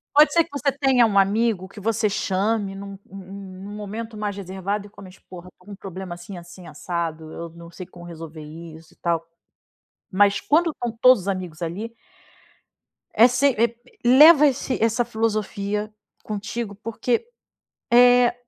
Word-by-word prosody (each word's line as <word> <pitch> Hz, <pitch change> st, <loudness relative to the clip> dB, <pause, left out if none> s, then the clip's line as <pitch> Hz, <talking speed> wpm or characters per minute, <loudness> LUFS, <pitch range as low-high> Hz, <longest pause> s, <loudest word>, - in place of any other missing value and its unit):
Pode 300 Hz, +1 st, +7 dB
ser 335 Hz, -1 st, +4 dB
que 335 Hz, -, -20 dB
você 280 Hz, 0 st, 0 dB
tenha 265 Hz, -4 st, +3 dB
um 200 Hz, -2 st, 0 dB
amigo 200 Hz, -1 st, +2 dB
que 205 Hz, +2 st, -13 dB
você 220 Hz, +1 st, 0 dB
chame 200 Hz, +1 st, -1 dB
em 195 Hz, -, -8 dB
um 200 Hz, 0 st, -8 dB, 0.2 s
em 195 Hz, -, -13 dB
um 190 Hz, 0 st, -10 dB
um -, -, -7 dB
momento 215 Hz, +2 st, -6 dB
mais 205 Hz, -1 st, -4 dB
reservado 195 Hz, +2 st, -4 dB
e -, -, -13 dB
comente: 190 Hz, -2 st, -14 dB
"Porra, 180 Hz, -1 st, -11 dB
estou 180 Hz, +1 st, -27 dB
com -, -, -10 dB
um -, -, -7 dB
problema 190 Hz, -2 st, -7 dB
assim, 175 Hz, +2 st, -9 dB
assim, 175 Hz, +1 st, -12 dB
assado, 160 Hz, 0 st, -4 dB
eu 170 Hz, 0 st, -7 dB
não 170 Hz, +1 st, -13 dB
sei 185 Hz, +1 st, -9 dB
como 175 Hz, -2 st, -13 dB
resolver 165 Hz, -2 st, -9 dB
isso 160 Hz, +1 st, -12 dB
e -, -, -28 dB
tal", 170 Hz, -1 st, -1 dB, 0.9 s
mas 200 Hz, +1 st, +4 dB
quando 330 Hz, +3 st, +2 dB
estão 240 Hz, -6 st, -5 dB
todos 250 Hz, -7 st, +5 dB
amigos 180 Hz, -4 st, -4 dB
ali 205 Hz, +8 st, -5 dB, 1.2 s
é 235 Hz, -, +6 dB
se 250 Hz, +3 st, +2 dB
eh, 235 Hz, +1 st, +2 dB, 0.3 s
leva 300 Hz, +4 st, +8 dB
esse 260 Hz, -2 st, -2 dB
essa 230 Hz, +2 st, +2 dB
filosofia 215 Hz, -2 st, -2 dB, 0.3 s
contigo 210 Hz, +1 st, -5 dB
porque, 230 Hz, -, -2 dB, 0.7 s
eh 245 Hz, 0 st, +6 dB
200 Hz, 170 wpm, -23 LUFS, 180-230 Hz, 1.2 s, leva